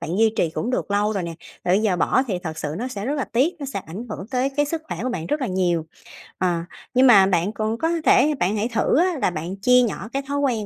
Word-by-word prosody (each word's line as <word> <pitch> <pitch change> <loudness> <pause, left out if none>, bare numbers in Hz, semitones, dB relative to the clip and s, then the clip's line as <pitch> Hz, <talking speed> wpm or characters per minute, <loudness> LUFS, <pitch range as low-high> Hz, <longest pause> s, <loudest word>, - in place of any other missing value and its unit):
bạn 170 +7 -3
duy 225 -1 +4
trì 165 - +1
cũng 225 +9 -3
được 250 - -2
lâu 205 +1 +1
rồi 195 -3 -2
nè, 170 -1 -5 0.3
ờ, 180 - +1
giờ 205 -3 +2
bỏ 260 - +2
thì 190 -7 -2
thật 160 -2 -5
sự 150 0 -3
nó 250 - -3
sẽ 205 -5 -5
rất 285 - 0
là 280 -3 -1
tiếc, 280 +10 +1
nó 280 - -5
sẽ 200 -8 -4
ảnh 195 +9 -7
hưởng 195 - -6
tới 255 +1 0
cái 290 - +3
sức 320 +1 -3
khỏe 170 - -4
của 255 - -1
bạn 170 -10 -4
rất 295 - -1
là 260 - -1
nhiều. 175 -5 0 0.5
Ờ, 175 -2 +1 0.3
nhưng 255 +1 +5
mà 200 -6 +8
bạn 185 0 +1
cũng 220 +2 -2
có 325 - 0 0.2
thể, 305 - +5
bạn 190 +5 +1
hãy 210 +3 0
thử 230 - +2
á 355 -2 +2
là - - +3
bạn 175 +3 -5
chia 250 +2 +5
nhỏ 220 -2 -2
cái 275 - 0
thói 285 0 -2
quen 245 -7 0
215 Hz, 280 wpm, -22 LUFS, 180-260 Hz, 0.5 s, mà